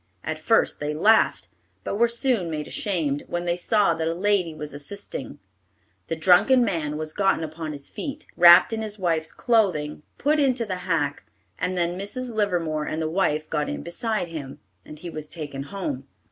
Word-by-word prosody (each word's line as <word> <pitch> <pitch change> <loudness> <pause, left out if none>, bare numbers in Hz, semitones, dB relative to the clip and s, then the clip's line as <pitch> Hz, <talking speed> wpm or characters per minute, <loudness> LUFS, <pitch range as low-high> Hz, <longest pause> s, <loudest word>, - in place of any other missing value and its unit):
At 155 0 -3
first 225 +8 +2
they 150 +1 -2
laughed, 215 +8 +3 0.4
but - - -3
were 235 - +5
soon 235 -6 0
made 150 -2 -3
ashamed, 155 -8 -1
when 175 0 -3
they 175 0 +1
saw 195 0 +2
that 160 0 -2
a 165 - -1
lady 185 -3 +1
was 150 -1 -6
assisting. 145 +8 -6 0.7
The - - -2
drunken 260 -2 +5
man 155 -7 -2
was 155 0 -4
gotten 195 -4 +2
upon 160 0 -5
his 140 -2 -7
feet, 290 +1 -6
wrapped 175 +5 +8
in 220 - -2
his 215 -1 -4
wife's 165 -4 0
clothing, 185 -12 +1 0.2
put 300 +2 +2
into 255 -4 +2
the 185 -3 -3
hack, 145 -4 0 0.3
and 185 0 -1
then 175 +1 0
Mrs. 240 +5 -4
Livermore 170 -8 0
and 155 - -3
the 160 - -1
wife 155 -4 0
got 150 -2 -1
in - - -4
beside 210 +1 -2
him, 145 -5 -7 0.2
and 150 - -11
he 175 - -7
was 155 -1 -7
taken 145 -5 -6
home. 145 -9 -4
175 Hz, 185 wpm, -24 LUFS, 155-205 Hz, 0.7 s, wrapped